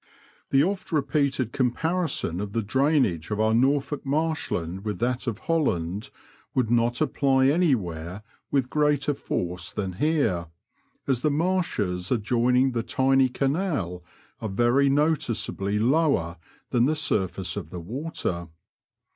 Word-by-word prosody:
The 135 +1 +4
oft 190 +2 -2
repeated 140 -5 0
comparison 135 - 0
of 105 -1 -5
the 115 - 0
drainage 130 - +1
of 105 0 -2
our 110 0 +3
Norfolk 135 +4 +1
marshland 135 - -2
with 105 -3 -3
that 125 +4 -1
of 115 -4 -1
Holland 105 - -1 0.5
would 125 -3 +1
not 120 +2 +2
apply 135 -3 +2
anywhere 105 - 0 0.3
with 130 -3 0
greater 150 -1 +2
force 90 -9 -3
than 95 -3 -3
here, 140 - +1 0.6
as 130 -3 0
the 150 - +2
marshes 145 - 0
adjoining 125 +3 +2
the 120 -2 -1
tiny 135 +2 +2
canal 135 - -1 0.4
are 110 - -4
very 120 +7 +3
noticeably 120 -9 0
lower 115 - +2 0.3
than 120 0 +3
the 155 - +1
surface 95 - -1
of 75 - -5
the 90 - -6
water. 95 - -4
125 Hz, 130 wpm, -25 LUFS, 100-145 Hz, 0.6 s, The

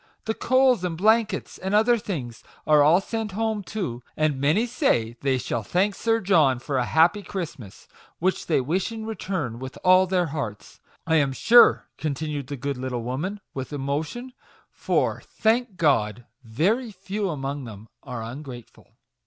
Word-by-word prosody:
The 220 - 0
coals 255 -3 +3
and 170 -3 -2
blankets, 215 +1 +1
and 190 +2 -1
other 225 +3 +5
things, 145 - -5 0.2
are 150 -1 +5
all 155 +5 +6
sent 220 0 -4
home 220 0 -1
too, 180 - -5 0.2
and 150 -3 0
many 160 +11 +3
say 120 - 0
they 135 -2 +1
shall 120 -1 -2
thank 185 - +1
Sir 225 +2 +1
John 165 - +3
for 130 +2 -2
a 125 - 0
happy 170 +9 +3
Christmas; 150 - -7 0.3
which 185 +2 -1
they 160 - +3
wish 175 - -1
in 220 -1 -6
return, 185 - -4
with 130 0 -8
all 185 +1 +6
their 180 -1 +1
hearts, 140 -10 -6 0.3
I 160 0 +3
am 140 -3 +2
sure," 240 - +7
00 - - -7
MAGIC - - -17
WOEDS. - - -30
continued 150 -2 -3
the 145 0 -5
good 140 +1 -3
little 125 -2 -4
woman, 160 - -4
with 130 +1 -6
emotion; 150 - -4 0.2
" - - -33
for, - - +1
thank 225 -2 0
God, 120 - +1 0.2
very 185 - 0
few 195 +1 -4
among 140 -2 -4
them 110 -1 -10
are 115 -2 -6
ungrateful." 120 0 -10
160 Hz, 175 wpm, -24 LUFS, 130-205 Hz, 0.3 s, sure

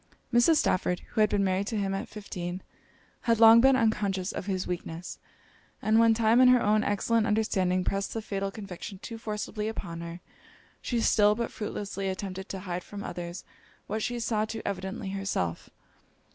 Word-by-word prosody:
Mrs. 240 +8 +5
Stafford, 180 -9 +1
who 220 - +1
had 215 - +5
been 200 -1 +1
married 190 +1 0
to 225 - -2
him 195 -1 -1
at 195 - -3
fifteen, 185 -3 -6 0.7
had 230 -1 +4
long 225 0 +9
been 265 +1 +6
unconscious 200 -5 0
of 195 - -6
his 190 -2 -1
weakness: 175 -1 -5 0.6
and 220 +1 +3
when 230 -1 +5
time 230 +2 +4
and 255 - +8
her 250 0 +6
own 215 -1 +2
excellent 220 +2 +1
understanding 190 -4 +1
pressed 195 +3 -2
the 225 - -2
fatal 195 -2 -2
conviction 195 -1 -8
too 225 +4 -8
forcibly 210 0 -4
upon 170 -6 -5
her, 170 +1 -7 0.6
she 240 - -1
still, 210 -2 +4
but 235 0 -3
fruitlessly, 200 -2 -4
attempted 190 0 -5
to 190 - -5
hide 180 -2 -4
from 205 0 -8
others 175 0 -6 0.4
what 215 +2 -3
she 240 +2 -2
saw 225 -2 0
too 220 +1 -5
evidently 190 0 -4
herself. 195 - -2
205 Hz, 175 wpm, -28 LUFS, 185-220 Hz, 0.7 s, long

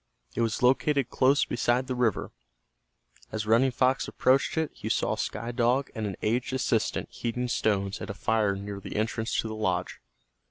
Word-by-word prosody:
It - - -1
was 115 +1 -1
located 135 0 +3
close 135 +2 +3
beside 120 +1 +1
the 130 - -3
river. 125 -5 0 1.0
As 110 -1 -3
Running 115 +5 +4
Fox 130 +1 +1
approached 135 +4 +2
it 160 -2 0
he - - -6
saw - - +1
Sky 115 +3 -3
Dog 125 +3 +1
and 110 -2 -3
an 95 - -4
aged 125 +4 0
assistant 120 -4 0
heating 125 +1 -3
stones 100 -4 0
at - - -6
a 100 - -4
fire 105 -2 +1
near 100 0 -6
the - - -8
entrance 110 +1 -1
to - - -5
the 110 - -5
lodge. 95 -5 -2
115 Hz, 175 wpm, -28 LUFS, 105-130 Hz, 1.0 s, Running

